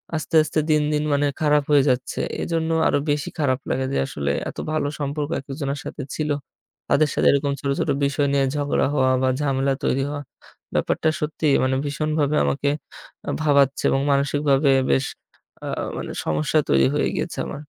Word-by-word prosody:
আস্তে, 155 0 -3
আস্তে 155 - -1
দিন, 150 -1 +4
দিন 150 0 +1
মানে 145 0 +2
খারাপ 150 -1 +3
হয়ে 140 -2 +6
যাচ্ছে। 125 0 -1 0.2
এজন্য 165 -1 -1 0.2
আরও - - +2
বেশি 145 -1 -1
খারাপ 130 -3 +1
লাগে 130 - 0
যে, - - 0
আসলে 70 -1 -2 0.2
এত - - -11
ভালো 155 -2 0
সম্পর্ক 145 +1 -2
এক-একজনের 140 +1 -4
সাথে 140 - -6
ছিল। 155 -1 -2 0.6
তাদের 150 0 +3
সাথে - - +2
এরকম 140 0 +1
ছোট, 140 - -3
ছোট - - 0 0.2
বিষয় 145 0 +1
নিয়ে 140 -1 +3
ঝগড়া 145 -1 +1
হওয়া 130 -2 +3
বা 130 - +3
ঝামেলা 135 -1 +1
তৈরি 135 +1 +1
হওয়া 145 0 -5 0.5
ব্যাপারটা 160 - +1
সত্যিই 150 -1 +1
মানে 130 0 +1
ভীষণভাবে 150 0 0
আমাকে 140 +1 0 0.6
আ - - -1
ভাবাচ্ছে 140 -2 +3
এবং 135 - +2
মানসিকভাবে 140 0 +2 0.2
বেশ 135 - +2 0.6
আ - - -4 0.3
মানে - - -5
সমস্যা 75 -1 +1
তৈরি 65 -1 +4
হয়ে - - +1
গিয়েছে - - -3
আমার। 150 - -6
140 Hz, 170 wpm, -23 LUFS, 135-150 Hz, 0.6 s, হয়ে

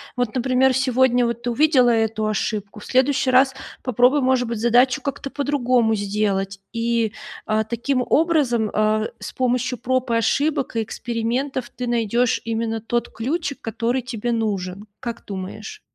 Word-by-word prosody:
вот, 245 -2 -1
например, 260 +1 +3
сегодня 255 -1 +3
вот 235 0 -2
ты 245 - -1
увидела 260 -1 +4
эту 220 -2 +1
ошибку, 210 0 -3
в - - -11
следующий 260 +1 +2
раз 265 +1 +5 0.3
попробуй, 255 +3 +3
может 260 -1 +2
быть, 230 -1 -3
задачу 245 +5 +3
как-то 280 +1 -4
по-другому 250 -6 +1
сделать. 200 -1 -1
И, 230 -2 0 0.3
а, 215 0 +1
таким 240 +4 -1
образом, 285 -9 +2
а, 215 0 +2
с - - -7
помощью 250 -1 0
проб 255 0 -1
и - - +2
ошибок, 270 +4 0
и 225 - +1
экспериментов, 240 +4 -3
ты 250 -1 -5
найдешь 235 +1 +1
именно 225 -1 -2
тот 235 +1 -2
ключик, 280 +5 -3
который 230 +3 -1
тебе 240 -1 -3
нужен. 200 -3 -2
Как 235 -2 -6
думаешь? 200 - -7
240 Hz, 150 wpm, -22 LUFS, 220-260 Hz, 0.3 s, раз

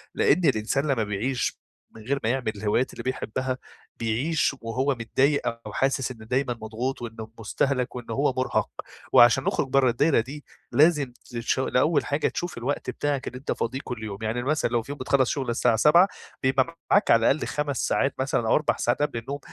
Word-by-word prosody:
لأن 170 +4 +3
الإنسان 135 +2 +1
لما 125 -6 +1
بيعيش 110 +6 -2 0.3
من 110 - -11
غير 140 +4 -1
ما 110 - +1
يعمل 125 -3 0
الهوايات 105 +5 0
اللي - - -7
بيحبها 130 0 -2 0.4
بيعيش 140 +7 0
وهو 130 +5 0
متضايق 135 +5 +1 0.2
أو - - -7
حاسس 135 -1 0
إنه 110 -3 -11
دايمًا 125 +2 0
مضغوط 120 +5 -3
وإنه 115 -2 -7
مستهلَك 125 +4 -1
وإنه 120 -1 -6
هو 140 -1 +1
مرهق، 130 - 0 0.4
وعشان 120 +3 +7
نخرج 140 - 0
بره 130 -1 +3
الدايرة 140 +5 +3
دي 140 +6 -6 0.3
لازم 145 -4 +3
تش 120 +2 -2
الأول 140 +4 +2
حاجة 145 +1 0
تشوف 175 -6 -4
الوقت 125 +5 -3
بتاعك 145 -2 -2
اللي 125 - -5
أنت 135 - -4
فاضيه 130 +3 -2
كل 120 -3 -6
يوم، 100 -2 -5
يعني 120 +3 -1
مثلًا 150 0 +1
لو 120 -1 +1
في 140 - -8
يوم 145 - -7
بتخلص 130 -1 +2
شغل 135 -4 -2
الساعة 120 0 +2
19:00 160 - +6 0.4
بيبقى 130 +5 +1
معاك 205 - +4
على 115 +1 +5
الأقل 155 - -1
5 145 -3 -2
ساعات 135 - +1
مثلًا 130 -4 0
أو - - +4
4 150 - +1
ساعات 120 +4 0
قبل 145 -5 0
النوم، 140 +5 -6
130 Hz, 190 wpm, -25 LUFS, 115-140 Hz, 0.4 s, وعشان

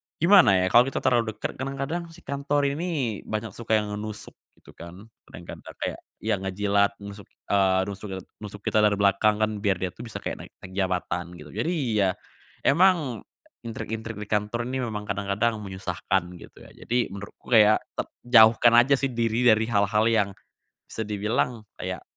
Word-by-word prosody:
gimana 170 - +6
ya - - +2
kalau 120 +2 +6
kita - - -2
terlalu 115 -4 +1
dekat, 105 - -5
kadang-kadang 140 +6 -3
si 175 - -17
kantor 140 0 0
ini 145 - -2
banyak 110 0 -3
suka 115 -1 0
yang 105 - -6
nusuk 110 0 -7 0.2
gitu - - -18
kan, 90 +7 -12 0.2
kadang-kadang 85 +2 -11
kayak - - -3 0.2
ya, 110 -2 0
ngejilat, 100 +1 +1
nusuk, 100 0 -10 0.2
eee, 95 -2 +3
nusuk, 100 +1 -7
eee, 95 - -7 0.2
nusuk 105 -1 -9
kita 110 - +1
dari 105 -1 +4
belakang 105 +2 +2
kan 110 - +1
biar 100 -2 +1
dia 90 0 -3
tuh 120 +5 -10
bisa 115 - -8
kayak - - -4
naik - - -30
naik 95 - -9
jabatan 90 -2 -2
gitu. 75 -3 -12
Jadi 135 - -2 0.3
ya, 95 -2 +3 0.5
emang 160 - +3 0.4
intrik-intrik 110 -1 -6
di 105 - -5
kantor 105 +3 -1
ini 130 0 -2
memang 105 -3 -4
kadang-kadang 100 +3 -1
menyusahkan 95 -1 -2 0.2
gitu - - -14
ya, - - -15
jadi 120 - 0 0.2
menurutku 100 +4 -8
ya 110 -1 +7 0.2
te - - -2 0.2
jauhkan 115 -1 +6
aja 140 +3 +3
sih 135 - -1
diri 115 +1 0
dari 110 -1 +4
hal-hal 105 0 +2
yang 105 -3 +2 0.6
bisa - - -6
dibilang 110 +2 -1 0.2
kayak, - - -5
110 Hz, 175 wpm, -25 LUFS, 100-120 Hz, 0.6 s, ya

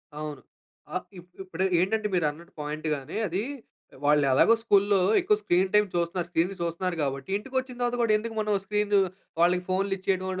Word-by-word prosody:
అవును. 150 -2 -6 0.5
అహ్, 180 - -2
ఇప్ 175 +1 -16
ఇప్పుడు 185 -1 -3 0.2
ఏంటంటే 210 +4 +1
మీరు 175 -3 +2
అన్నట్టు 170 +3 -15
పాయింట్‌గానే 150 -1 -3
అదీ 185 +3 -2 0.6
వాళ్ళు 150 0 +4
ఎలాగో 135 +12 +5
స్కూల్లో 200 -2 +3 0.2
ఎక్కువ 210 - +3
స్క్రీన్ 185 -1 +2
టైం 210 0 +5
చూస్తున్నారు. 170 0 -1
స్క్రీన్‌న్ని 175 +3 0
చూస్తున్నారు 170 +2 -2
కాబట్టి 135 0 -3
ఇంటికి 265 +6 -11
వచ్చిన 260 -1 -8
తర్వాత 245 0 +1
కూడా 230 -2 +3
ఎందుకు 225 +1 -5
మనం 210 -1 0
స్క్రీను 210 0 +2 0.4
వాళ్ళకి 180 +1 +3
ఫోన్‌లిచ్చేయడం 190 0 0
185 Hz, 160 wpm, -27 LUFS, 165-210 Hz, 0.6 s, ఎలాగో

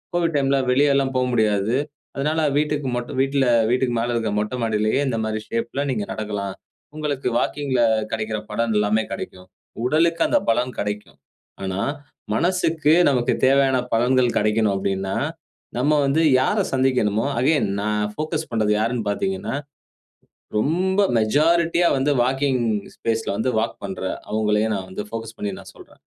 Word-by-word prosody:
Covid 170 -1 +1
டைம்ல 135 0 +2
வெளியலாம் 140 0 +3
போ - - +2
முடியாது. 110 0 +2 0.4
அதனால 150 +3 0 0.2
வீட்டுக்கு 150 -3 0
மட்டும் 120 +1 -4
வீட்ல 135 0 +1 0.3
வீட்டுக்கு 125 -1 +1
மேல 120 +1 -1
இருக்க 110 -3 -1
மொட்ட 105 +4 -2
மாடியிலேயே 110 +3 +1
இந்த 115 - -1
மாரி 110 0 -2
ஷேப்ல 115 +4 -2
நீங்க 105 -5 -2
நடக்கலாம். 105 -3 -4 0.4
உங்களுக்கு 145 -4 -2
வாக்கிங்ல 135 -4 0 0.3
கிடைக்கிற 110 -1 -2
பலன் 115 +1 0
எல்லாமே 105 +1 +2
கிடைக்கும். 90 -1 -7 0.4
உடலுக்கு 165 +4 +2
அந்த 295 - +3
பலன் 125 +2 -1
கிடைக்கும். 105 0 -5 0.5
ஆனா 95 0 -3 0.6
மனசக்கு 165 -3 +2 0.2
நமக்கு 125 -3 +1
தேவையான 135 -1 +4 0.2
பலன்கள் 125 +1 +2
கிடைக்கணும் 105 0 +2
அப்டின்னா, 95 0 -2 0.6
நம்ம 150 +4 +2
வந்து 140 +4 +2 0.2
யார 170 +11 +1 0.2
சந்திக்கணுமோ 125 -5 +1
அகைன் 140 -3 +2
நான் 105 0 0
ஃபோகஸ் 155 +2 -3
பண்றது 110 -3 +1
யாருன் 115 0 -1
பார்த்தீங்கன்னா, 190 - -2 1.0
ரொம்ப 185 - +1 0.2
மெஜாரிட்டியா 165 +9 +3
வந்து 135 +2 +1
வாக்கிங் 130 0 +1 0.3
ஸ்பேஸ்ல 115 -1 -2
வந்து 120 - 0
வாக் 115 - -2
பண்ற 95 -1 -5 0.3
அவங்களயே 105 0 +1
நான் 95 -2 -4
வந்து 95 +2 -5
ஃபோகஸ் 115 0 -6
பண்ணி 105 - -3
நான் - - -12
சொல்றேன். - - -17
125 Hz, 140 wpm, -22 LUFS, 110-145 Hz, 1.0 s, தேவையான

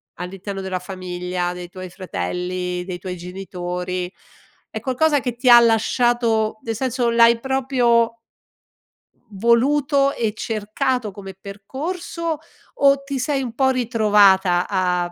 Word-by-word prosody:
all'interno 195 +2 -6
della 190 -1 -3
famiglia, 180 -1 -4
dei 180 0 -7
tuoi 185 0 -8
fratelli, 180 - -4
dei 180 -2 -5
tuoi 180 0 -6
genitori, 180 0 -5 0.6
è - - -4
qualcosa 290 +3 +2
che 245 -3 -3
ti 250 +1 -4
ha 240 0 +10
lasciato, 230 -1 +2
nel 225 -1 -3
senso 245 0 0
l'hai 235 0 +5
proprio 245 -3 +1 1.1
voluto 275 +6 +2
e 225 -2 -1
cercato 225 +2 -2
come 195 0 -9
percorso 295 - -5 0.4
o 275 0 +4
ti 275 -1 -4
sei 275 +2 0
un 245 -4 -5
po' 265 +2 +2
ritrovata 205 -7 +3
a 180 -2 0
220 Hz, 125 wpm, -21 LUFS, 185-255 Hz, 1.1 s, ha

